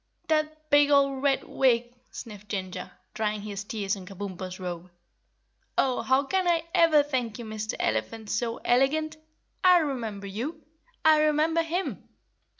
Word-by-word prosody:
"That 310 0 -1
big 290 0 +6
old 275 -2 +3
Red 275 -1 +2
Wig," 240 -2 +1 0.2
sniffed 210 -3 -10
Ginger, 185 -2 -4 0.2
drying 215 -1 -1
his 200 -2 -5
tears 205 -2 -2
on 190 -2 -10
Kabumpo's 185 -1 -6
robe. 180 -1 -6 0.9
"Oh, 255 -2 +2
how 260 +2 +3
can 370 +6 0
I 335 -2 +2
ever 330 -4 +5
thank 250 -6 -2
you, 240 - -7
Mister 215 0 -4
Elephant 110 - -2
so 230 +1 -1
Elegant! 310 +6 +2 0.5
I 365 -1 +7
remember 235 - -2
you! 240 - -4 0.5
I 310 -1 +7
remember 310 +2 +3
him!" 340 +3 -3
250 Hz, 145 wpm, -27 LUFS, 205-305 Hz, 0.9 s, I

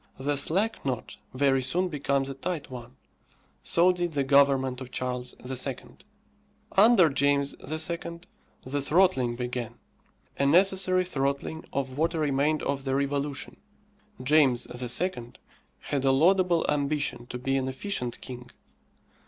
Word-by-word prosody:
The 145 +2 -1
slack 190 +10 +1
knot 130 -4 -4
very 135 0 +2
soon 175 +8 0
becomes 140 -4 -1
a 135 - -5
tight 150 +1 -5
one. 125 0 -9 0.7
So 175 +2 +3
did 175 -2 -2
the 140 -1 +1
government 135 -2 +3
of 130 - -7
Charles 125 -1 -4
II. 130 0 -1 1.0
Under 205 -3 +6
James 140 0 +1
II. 170 +2 -3 0.4
the 140 +2 -2
throttling 140 -6 +2
began; 125 -1 -4 0.6
a 140 - +3
necessary 185 +2 +3
throttling 140 0 -2
of 135 0 -3
what 165 +2 +1
remained 150 0 +1
of 140 -1 -2
the 135 0 -1
revolution. 140 0 -2 0.7
James 135 -3 +3
II. 125 +1 -2 0.5
had 140 -2 -2
a 135 - +4
laudable 175 +4 +3
ambition 145 -4 -1
to 125 - -6
be 135 +2 -1
an 130 -1 -1
efficient 130 -3 -3
king. 125 -1 -8
140 Hz, 130 wpm, -27 LUFS, 130-165 Hz, 1.0 s, Under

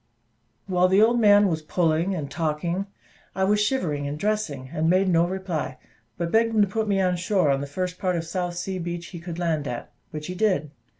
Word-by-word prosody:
While 180 -1 +3
the 190 +2 +4
old 235 +3 +4
man 205 -2 +6
was 160 -4 -1
pulling 165 +3 +1
and 145 -5 -5
talking, 170 +4 -2 0.5
I 190 - 0
was 210 +2 +3
shivering 155 - -1
and 145 +1 -4
dressing, 155 -10 -2
and 160 +1 +1
made 185 +2 +3
no 170 -1 +3
reply; 180 -8 -3 0.4
but 170 -1 -2
begged 225 0 +3
him 215 - +5
to - - +1
put 220 +3 -2
me 200 -1 +2
on 180 -1 +2
shore 185 -4 +2
on 135 0 0
the 140 - -4
first 180 +5 -4
part 185 -2 0
of 165 -1 -2
South 175 +1 -3
Sea 185 +1 -3
Beach 175 0 -4
he 175 - -8
could 170 0 -7
land 160 -4 -1
at, 120 - -5 0.2
which 150 -1 -6
he 180 - -4
did. 185 -7 0
180 Hz, 220 wpm, -25 LUFS, 160-195 Hz, 0.5 s, man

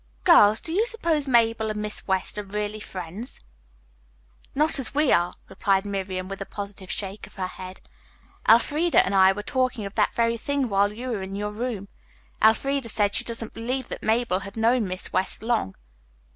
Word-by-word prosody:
"Girls, 210 - +6
do 325 - -3
you 435 +6 +2
suppose 330 - 0
Mabel 230 -3 +3
and 210 0 -3
Miss 210 0 -3
West 190 +2 -1
are - - -4
really 210 +1 -4
friends?" 190 +3 -7 1.2
"Not 305 +1 +3
as 265 +1 -4
we 300 -1 +3
are," 175 +1 +3
replied 195 +1 0
Miriam, 190 -2 -3
with 195 0 -7
a - - -3
positive 200 -2 -7
shake 200 0 -4
of - - -19
her 190 -2 -2
head. 185 0 -9 0.7
"Elfreda 295 +9 +4
and 195 - -2
I 190 -1 +6
were 205 +2 -5
talking 255 -3 -1
of 200 - -7
that 210 -2 +2
very 230 0 +1
thing 280 +1 -1
while 200 0 +2
you 240 +4 -6
were 220 -5 -2
in 190 +1 -6
your 210 +1 -3
room. 215 -2 -4 0.5
Elfreda 260 +3 +2
said 205 -2 +1
she - - +3
didn't 230 -1 -3
believe 255 +3 -3
that - - -6
Mabel 220 -4 +1
had 200 +2 -10
known 230 -1 +2
Miss 185 +1 -5
West 190 +3 +1
long." 225 - 0
210 Hz, 185 wpm, -25 LUFS, 195-245 Hz, 1.2 s, Girls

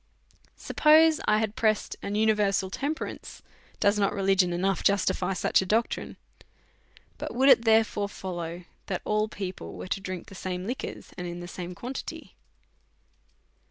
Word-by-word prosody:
Suppose 315 +1 +5
I 210 - +4
had 215 0 -1
pressed 215 -2 +1
an 200 - -3
universal 210 -3 +2
temperance, 290 +8 -5 0.4
does 205 +1 +3
not 200 -1 +2
religion 195 -2 +3
enough 185 +1 0
justify 190 -2 +1
such 185 - +2
a - - -3
doctrine? 225 +4 -1 1.0
But - - -5
would 265 +3 +5
it 235 -3 +6
therefore 220 -2 +3
follow 175 -3 -6 0.2
that 190 -3 -3
all 210 0 +1
people 190 -3 -6
were - - -7
to 195 - -1
drink 185 -2 -5
the - - -13
same 185 -1 -4
licjuors, 250 +5 -6
and 175 0 -5
the - - -7
same 175 0 -7
quantity 250 +8 -7
200 Hz, 145 wpm, -27 LUFS, 185-220 Hz, 1.0 s, it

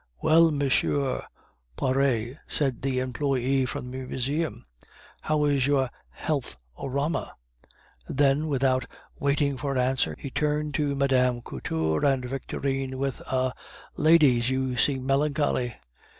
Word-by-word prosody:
"Well, 165 +1 +5
Monsieur 145 -1 +1
r 135 -2 0
r - - -11 0.5
Poiret," 130 -1 0
said 135 -5 0
the 135 -1 -1
employe 130 0 0
from 125 -1 -5
the 130 - -5
Museum, 130 -2 -2 0.6
"how 150 -1 +1
is 140 -3 +2
your 135 -3 +2 0.2
health 140 - -3 0.2
orama?" 140 +5 -2 0.8
Then, 140 +2 +2
without 130 -2 +1 0.3
waiting 140 -1 +1
for 140 0 -2
an - - -1
answer, 130 +1 +1
he 140 - -7
turned 150 +1 0
to 145 -1 0
Mme. 130 -3 +2
Couture 80 -6 -2
and 135 -3 +2
Victorine 135 0 -3
with 135 -1 -2
a 130 -1 +1 0.4
"Ladies, 145 -7 +5
you 130 -1 -1
seem 130 +2 +1
melancholy." 140 -3 +1
135 Hz, 130 wpm, -26 LUFS, 130-145 Hz, 0.8 s, Well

